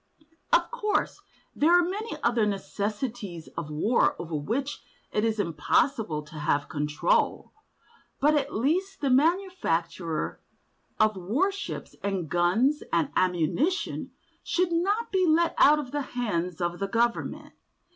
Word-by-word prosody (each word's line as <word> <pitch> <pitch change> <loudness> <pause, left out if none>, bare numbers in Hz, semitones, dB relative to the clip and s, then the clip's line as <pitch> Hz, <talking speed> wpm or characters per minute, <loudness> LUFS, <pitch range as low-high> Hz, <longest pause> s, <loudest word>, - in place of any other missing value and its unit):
Of - - +3
course 425 -4 -1 0.3
there 335 +4 +5
are 350 -1 +3
many 420 +5 -4
other 235 -2 +2
necessities 205 -2 -4
of 165 -2 -4
war 180 +11 +2
over 165 -1 -7
which 230 - -2 0.3
it 210 - 0
is 225 -1 0
impossible 170 - +1
to 150 +1 -10
have 145 -1 0
control, 150 0 0 0.7
but 300 +2 +4
at 285 -1 0
least 365 - 0
the 275 -3 +1
manufacture 260 - 0 0.6
of 215 -1 +4
warships 300 - -2
and 195 -4 -2
guns 190 - +2
and 160 -4 +1
ammunition 185 - 0 0.3
should 360 0 0
not 400 +7 0
be 380 -1 +2
let 330 +2 +3
out 300 +2 +7
of 275 -4 -5
the 290 - -1 0.2
hands 180 -7 -1
of 175 0 -1
the 195 - -1
government. 230 +3 -1
230 Hz, 130 wpm, -27 LUFS, -, 0.7 s, out